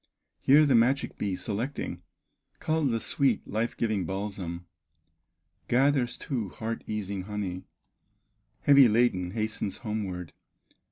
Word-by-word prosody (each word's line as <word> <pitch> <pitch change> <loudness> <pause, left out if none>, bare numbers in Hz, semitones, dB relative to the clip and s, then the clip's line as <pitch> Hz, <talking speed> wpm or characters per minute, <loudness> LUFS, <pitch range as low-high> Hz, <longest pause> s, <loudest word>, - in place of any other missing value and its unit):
Here 150 +3 +6
the 140 - +3
magic 125 +4 +2
bee, 100 -3 -1
selecting, 115 +9 -4 0.6
Culls 160 -3 +1
the 115 -1 0
sweet, 130 0 0
life 110 +3 -2
giving 110 -5 0
balsam, 95 -2 -4 1.0
Gathers 130 0 +2
too, 120 -8 -3
heart 115 +4 -5
easing 100 -3 -3
honey, 95 -3 -4 1.0
Heavy 140 -3 +7
laden 105 -5 +2
hastens 110 -2 -2
homeward. 95 -5 -4
110 Hz, 110 wpm, -28 LUFS, 100-125 Hz, 1.0 s, Heavy